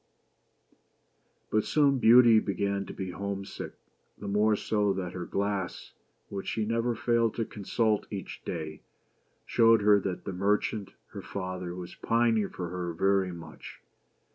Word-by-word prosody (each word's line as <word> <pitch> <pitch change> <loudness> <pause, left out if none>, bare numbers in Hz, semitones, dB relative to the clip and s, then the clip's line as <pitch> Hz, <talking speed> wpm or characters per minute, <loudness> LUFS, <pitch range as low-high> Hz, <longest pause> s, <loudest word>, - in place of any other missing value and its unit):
But 110 0 +2
soon 140 -3 +3
Beauty 120 -1 +7
began 100 -1 -2
to - - -7
be 95 -1 -5
home 100 +1 -4
sick; - - -7 0.4
the 100 - -7
more 105 +2 +3
so 105 -1 +1
that 90 -2 -4
her 90 -1 -5
glass, 100 -2 -2 0.4
which 100 -1 -6
she 110 - -1
never 115 +2 0
failed 115 -1 +1
to 115 - -1
consult 105 +1 -1
each 100 -3 -7
day, 80 -2 -5 0.6
showed 115 -2 +4
her 105 0 +6
that 95 -2 -4
the 100 - -4
merchant, 100 +1 0 0.2
her - - -8
father, 90 -2 -5
was 90 -1 -7
pining 115 -3 +1
for 90 -2 -5
her 90 -1 -4
very 95 +2 +2
much. 85 -2 -10
100 Hz, 145 wpm, -29 LUFS, 95-110 Hz, 0.6 s, Beauty